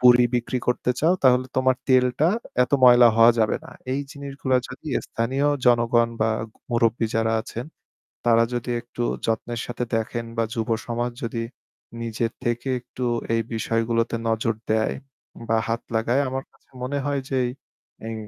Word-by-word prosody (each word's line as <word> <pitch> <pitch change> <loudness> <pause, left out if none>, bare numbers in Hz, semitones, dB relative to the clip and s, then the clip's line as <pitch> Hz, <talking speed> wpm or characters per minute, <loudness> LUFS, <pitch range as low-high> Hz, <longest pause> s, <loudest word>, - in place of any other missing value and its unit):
পুড়ি 125 0 +7
বিক্রি 120 +1 0
করতে 125 0 +1
চাও, 165 +4 +4
তাহলে 130 0 +5
তোমার 130 0 +3
তেলটা 130 +4 +4 0.4
এত - - -15
ময়লা 120 -1 +8
হওয়া 115 +1 +8
যাবে 110 -1 +2
না। - - -11 0.2
এই 140 - 0
জিনিসগুলা 140 -2 -2
যদি - - -11 0.2
স্থানীয় 130 +5 -1 0.2
জনগণ 120 -1 +4
বা 110 +1 +3 0.4
মুরুব্বি 115 -1 +2
যারা 115 0 +2
আছেন, 115 +2 -6 0.6
তারা 115 -1 +5
যদি 120 0 -3
একটু 120 0 -6 0.2
যত্নের 115 +1 -2
সাথে 120 0 -3
দেখেন 115 +1 -2
বা 115 - +2
যুব 115 0 -2 0.2
সমাজ 120 +1 -1
যদি 115 0 -2 0.6
নিজের 115 0 -2
থেকে 120 +2 -1
একটু 125 +1 -7 0.3
এই 115 - +2
বিষয়গুলোতে 115 +1 0
নজর 115 0 +1 0.2
দেয় 110 0 +2 0.5
বা 115 - +3
হাত 115 +1 -1
লাগায়, 120 +5 +2
আমার 135 +1 -3
কাছে - - -31
মনে 140 +3 -2
হয় 140 -1 0
যে 135 - -1
এই, 120 - 0 0.6
এই 115 - -4
120 Hz, 160 wpm, -24 LUFS, 115-125 Hz, 0.6 s, ময়লা